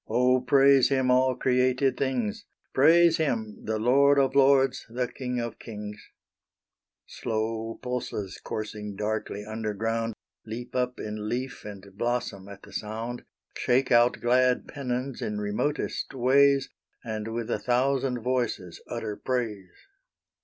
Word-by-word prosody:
Oh 125 +3 +3
praise 135 +1 +5
Him 130 -2 +2
all 130 0 +3
created 130 +1 +2
things, 125 -6 -2 0.3
Praise 165 +4 +6
Him, 115 -9 -1
the 110 0 -1
Lord 140 +5 +4
of 135 -1 +3
lords, 135 -1 +4
the 125 +2 -1
King 125 -1 -4
of 120 -1 -5
kings 105 -2 -8 1.0
Slow 115 0 -3
pulses 125 -6 -4
coursing 105 -1 -5
darkly 105 0 -3
underground, 110 +1 -2 0.3
Leap 120 +3 -7
up 125 0 -1
in 105 0 -4
leaf 125 +2 -4
and 100 -2 -8
blossom 120 -5 -2
at 100 0 -11
the - - -14
sound, 115 +3 -5 0.3
Shake 130 +2 +1
out 120 0 +4
glad 125 +1 +3
pennons 130 -2 -4
in 105 - -2
remotest 105 +9 -2
ways, 135 +2 +4 0.4
And 110 -2 -4
with 115 0 -3
a - - 0
thousand 125 0 +1
voices 120 -9 -2
utter 110 -3 -4
praise. 110 -8 -4
120 Hz, 130 wpm, -27 LUFS, 110-130 Hz, 1.0 s, Praise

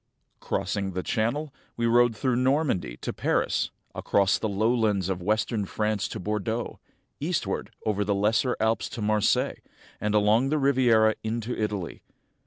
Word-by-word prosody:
Crossing 95 +1 -2
the 90 0 -3
Channel, 135 +7 -1 0.2
we 120 - 0
rode 120 0 +4
through 130 +1 +1
Normandy 125 - +1
to - - -3
Paris, - - 0 0.2
across 100 -1 +2
the 110 - -1
lowlands 105 -2 +1
of 90 -2 -2
western 105 +2 0
France 105 +1 -1
to - - -6
Bordeaux, 105 +4 -3 0.4
eastward - - -2 0.2
over 105 -1 +1
the 100 0 0
Lesser 115 +6 +1
Alps 110 +1 0
to - - -7
Marseilles, 105 0 +1 0.4
and 105 +1 -1
along 105 +5 +3
the 155 - +1
Riviera 125 -6 +4
into 115 +2 -3
Italy. 105 -5 -3
110 Hz, 145 wpm, -26 LUFS, 100-120 Hz, 0.4 s, rode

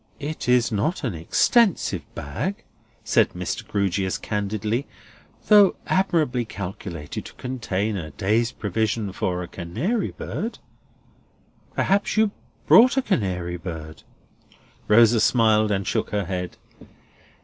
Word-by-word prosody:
"It 150 -3 -4
is 125 -1 +3
not 115 - -1
an 120 -7 -1
extensive 185 - +2
bag," 145 - -4 0.4
said - - +2
Mr. - - -4
Grewgious, 95 -2 0
candidly, 105 +4 -2 0.6
"though 205 -3 +6
admirably 155 -10 +1
calculated 90 -7 -6
to - - -11
contain 110 -5 -2
a 80 -4 -5
day's 110 - 0
provision 105 0 -2
for 90 -1 -2
a - - -7
canary 120 - -2
bird. 230 +3 -5 1.2
Perhaps 200 +2 +1
you 215 -1 +4 0.3
brought 250 +4 +6
a 270 - +3
canary 90 - -1
bird?" 80 -3 -8 0.9
Rosa 115 +1 +6
smiled 110 -2 +3
and 100 -2 -1
shook - - -1
her 105 -2 -1
head. 90 -1 -4
110 Hz, 115 wpm, -23 LUFS, 95-140 Hz, 1.2 s, though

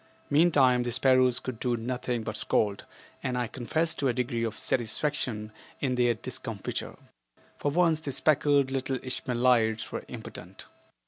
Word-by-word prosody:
Meantime 140 -5 +4
the 120 0 -2
sparrows 130 0 +4
could 125 -4 -6
do 120 -1 0
nothing 125 0 -3
but 110 - -4
scold, 105 -1 0 0.4
and 125 -1 -2
I 125 - 0
confess 155 +8 0
to 145 -3 -1
a 125 - +2
degree 120 -1 -2
of 115 -1 -3
satisfaction 120 -2 -1 0.3
in 130 -3 0
their 120 -1 +2
discomfiture. - - -5 0.6
For 145 - 0
once 165 0 +2
the 150 -3 -5
speckled 145 -1 +3
little 135 0 -1
Ishmaelites 120 -3 +1
were - - -4
impotent. - - -9
125 Hz, 145 wpm, -28 LUFS, 120-140 Hz, 0.6 s, Meantime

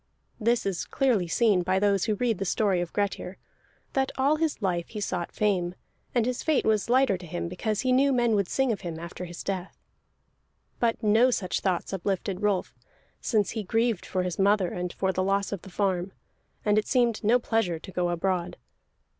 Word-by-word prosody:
This 235 +1 +1
is 195 -3 -2
clearly 240 -10 +1
seen 205 0 +3
by 185 +2 +1
those 200 -1 +2
who 215 -2 +1
read 230 -2 0
the - - 0
story 195 -1 +1
of 175 - -4
Grettir, 200 -2 -2 0.6
that 265 -1 +1
all 280 +4 +3
his 320 -1 -1
life 175 -5 -1
he 215 - -7
sought 180 -4 -3
fame, 185 -4 0 0.4
and 235 -2 +3
his 250 0 -2
fate 315 -3 +1
was 215 0 +1
lighter 250 -6 +3
to 180 - -10
him 170 +1 -3
because 200 +4 -2
he 255 - +1
knew 275 +2 +4
men 240 -3 +2
would 200 -3 +2
sing 265 -2 +1
of 210 - -3
him 170 -4 -5
after 170 +2 -7
his 175 -1 -8
death. 190 -1 -4 1.0
But 235 0 0
no 220 +4 +5
such 185 -7 -1
thoughts 185 0 -1
uplifted 195 +1 -2
Rolf, 205 -3 0 0.5
since 215 -4 +1
he 225 - -3
grieved 225 0 0
for 185 -1 -1
his 180 0 -3
mother 195 -2 +3
and 180 0 -4
for 190 +1 -1
the 185 - 0
loss 195 +1 0
of 200 -4 -4
the - - -11
farm, 190 -1 -1 0.5
and 210 0 +4
it 215 - -4
seemed 240 -4 +2
no 225 +4 +5
pleasure 225 -8 0
to 175 - -11
go 180 -1 0
abroad. 175 0 -1
200 Hz, 200 wpm, -27 LUFS, 180-230 Hz, 1.0 s, no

